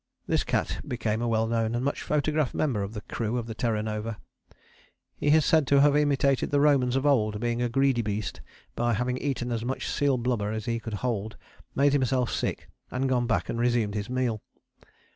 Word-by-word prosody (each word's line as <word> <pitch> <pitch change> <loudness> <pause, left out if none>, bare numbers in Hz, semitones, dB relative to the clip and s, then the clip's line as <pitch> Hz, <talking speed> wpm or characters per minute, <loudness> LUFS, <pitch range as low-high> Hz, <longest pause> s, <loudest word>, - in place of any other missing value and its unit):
This - - +1
cat - - -1
became 110 -2 -1
a 120 - 0
well 110 -1 +2
known 115 0 0
and 120 +2 -1
much 140 - -1
photographed 150 -2 0
member 130 -9 0
of 100 +3 -5
the 105 - -4
crew 115 +2 -3
of 120 - -2
the 115 - -6
Terra 110 -1 -1
Nova. 110 0 -4 1.0
He - - -3
is 155 +1 +5
said 155 -4 +3
to 140 0 +5
have 145 0 +5
imitated 140 -2 +2
the 145 - +2
Romans 135 -4 +3
of 135 +1 0
old, 110 -7 +2
being 120 +1 -1
a 120 - +1
greedy 135 -1 +2
beast, 105 -2 -3 0.3
by 120 -1 +1
having 125 +3 -1
eaten 125 -4 -2
as 115 -1 -2
much 130 +2 -3
seal 140 -2 +1
blubber 115 -4 -1
as 110 0 -4
he 115 -1 -1
could 115 -2 -5
hold, 110 -3 -2 0.4
made 140 +1 +3
himself 130 -2 +1
sick, - - -2 0.2
and 130 +2 -1
gone 125 -2 +1
back 115 - 0
and 115 - -3
resumed 120 -4 +1
his 105 +1 -4
meal. 125 -4 -1
120 Hz, 205 wpm, -27 LUFS, 110-135 Hz, 1.0 s, is